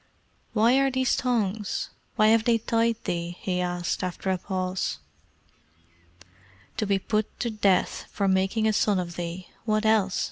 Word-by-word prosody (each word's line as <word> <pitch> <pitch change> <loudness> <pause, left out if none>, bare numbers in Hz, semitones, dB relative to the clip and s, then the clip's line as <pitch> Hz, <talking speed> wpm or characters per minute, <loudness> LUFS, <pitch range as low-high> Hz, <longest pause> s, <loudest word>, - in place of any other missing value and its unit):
"Why 235 +4 +4
are 275 0 +3
these 260 -1 +1
thongs? 220 -5 -1 0.2
Why 215 -2 +5
have 225 0 +4
they 235 -2 +4
tied 230 +1 +1
thee?" 170 0 -3
he 180 -1 -1
asked, 175 0 -2
after 185 +1 -2
a 185 - -1
pause. 185 - -2 1.8
"To 215 - -1
be 200 -1 +3
put 215 +2 -2
to 235 - -1
the 215 - -11
death 195 -3 +2
for 200 - 0
making 195 +4 +2
a 215 - +2
son 205 -1 +2
of 170 -1 -4
thee 175 +1 -5 0.2
what 215 -1 +1
else?" 210 -4 +3
205 Hz, 165 wpm, -26 LUFS, 185-225 Hz, 1.8 s, Why